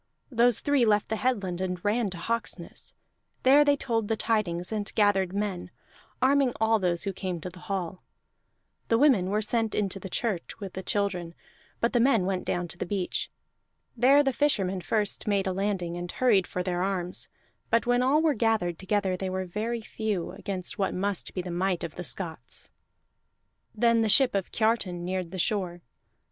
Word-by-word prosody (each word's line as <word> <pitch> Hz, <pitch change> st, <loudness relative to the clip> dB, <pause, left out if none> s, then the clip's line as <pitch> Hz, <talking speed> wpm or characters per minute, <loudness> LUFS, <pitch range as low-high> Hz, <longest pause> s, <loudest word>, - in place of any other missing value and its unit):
Those 240 Hz, -1 st, +4 dB
three 285 Hz, -3 st, +3 dB
left 210 Hz, -2 st, +2 dB
the 220 Hz, -, 0 dB
headland 200 Hz, -8 st, -1 dB
and 180 Hz, 0 st, -3 dB
ran 215 Hz, +1 st, +1 dB
to 180 Hz, -, -7 dB
Hawksness; 210 Hz, -3 st, -3 dB, 0.5 s
there 275 Hz, +3 st, +7 dB
they 285 Hz, -1 st, +3 dB
told 225 Hz, -5 st, -1 dB
the 225 Hz, -, +1 dB
tidings 200 Hz, -6 st, 0 dB
and 210 Hz, -2 st, -2 dB
gathered 195 Hz, -3 st, +3 dB
men, 200 Hz, -2 st, -3 dB, 0.5 s
arming 270 Hz, -1 st, +4 dB
all 220 Hz, 0 st, +3 dB
those 175 Hz, -3 st, 0 dB
who 195 Hz, -, -2 dB
came 185 Hz, -2 st, -4 dB
to 180 Hz, -, -6 dB
the 180 Hz, -, -13 dB
hall. 185 Hz, -1 st, -4 dB, 0.9 s
The 230 Hz, -, +3 dB
women 235 Hz, -9 st, +4 dB
were 210 Hz, +2 st, +1 dB
sent 225 Hz, 0 st, 0 dB
into 195 Hz, -1 st, -1 dB
the 190 Hz, -, -7 dB
church 205 Hz, -3 st, -3 dB
with 195 Hz, -3 st, -7 dB
the 190 Hz, -, -5 dB
children, 185 Hz, -4 st, -2 dB, 0.4 s
but 235 Hz, -, +1 dB
the 240 Hz, -, +3 dB
men 230 Hz, -6 st, +4 dB
went 190 Hz, -1 st, -2 dB
down 175 Hz, 0 st, -1 dB
to 175 Hz, -, -8 dB
the -, -, -2 dB
beach. 190 Hz, -1 st, -2 dB, 0.7 s
There 270 Hz, +5 st, +5 dB
the 270 Hz, -2 st, +1 dB
fishermen 195 Hz, -10 st, +1 dB
first 205 Hz, +6 st, 0 dB
made 200 Hz, -1 st, +2 dB
a 190 Hz, -, 0 dB
landing, 190 Hz, -3 st, -1 dB
and 175 Hz, 0 st, -5 dB
hurried 220 Hz, -8 st, +3 dB
for 180 Hz, -, -3 dB
their 180 Hz, -1 st, -1 dB
arms; 185 Hz, -2 st, -1 dB, 0.4 s
but 230 Hz, +1 st, +2 dB
when 245 Hz, 0 st, +3 dB
all 280 Hz, +5 st, +3 dB
were 315 Hz, -2 st, +4 dB
gathered 220 Hz, -8 st, 0 dB
together 190 Hz, -1 st, 0 dB
they 190 Hz, +1 st, -3 dB
were 185 Hz, 0 st, -2 dB
very 220 Hz, +6 st, -3 dB
few 215 Hz, -5 st, -3 dB
against 185 Hz, -2 st, -5 dB
what 195 Hz, -, 0 dB
must 200 Hz, 0 st, -1 dB
be 180 Hz, -, -2 dB
the 180 Hz, -, -5 dB
might 180 Hz, +1 st, 0 dB
of 170 Hz, -, -5 dB
the 180 Hz, -, -6 dB
Scots. 160 Hz, -8 st, -3 dB, 1.0 s
Then 230 Hz, +1 st, +3 dB
the 220 Hz, -, +1 dB
ship 265 Hz, +3 st, +5 dB
of 195 Hz, -2 st, -2 dB
Kiartan 205 Hz, -6 st, 0 dB
neared 185 Hz, -1 st, -2 dB
the 185 Hz, -, -7 dB
shore. 180 Hz, -2 st, -1 dB
200 Hz, 185 wpm, -27 LUFS, 180-230 Hz, 1.0 s, there